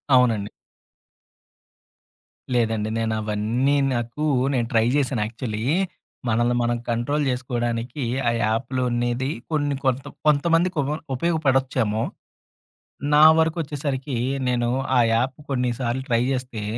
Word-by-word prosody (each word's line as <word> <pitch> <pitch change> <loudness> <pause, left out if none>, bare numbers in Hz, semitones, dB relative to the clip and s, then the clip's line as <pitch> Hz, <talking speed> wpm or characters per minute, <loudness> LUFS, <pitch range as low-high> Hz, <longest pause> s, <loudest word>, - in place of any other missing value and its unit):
అవునండి. 115 -5 +3 2.0
లేదండి. 110 -3 +1
నేనవన్నీ 110 +4 0 0.2
నాకు 120 +5 -3 0.3
నేను 120 -3 0
ట్రై 115 0 +4
జేశాను, 135 -5 +1
యాక్చువల్లీ 110 -1 -4 0.7
మనల్ని 120 +2 +2
మనం 120 0 +1
కంట్రోల్ 120 +6 0
జేసుకోడానికి, 120 +1 -2 0.3
ఆ - - +2
యాప్‌లున్నేది 120 +2 -1 0.2
కొన్ని 145 -2 0
కొంత 130 +1 +1 0.2
కొంతమందికి 165 +4 +3
ఉప 140 - -2 0.2
ఉపయోగపడొచ్చేమో. 130 -7 +1 1.1
నా 150 +1 +7 0.2
వరకొచ్చేసరికీ, 145 -5 -1 0.3
నేను 120 -1 +1 0.3
ఆ - - +6
యాప్ 125 +4 0
కొన్నిసార్లు 125 -1 -1
ట్రై 115 0 +3
జేస్తే, 125 -4 -3
125 Hz, 95 wpm, -23 LUFS, 115-135 Hz, 2.0 s, నా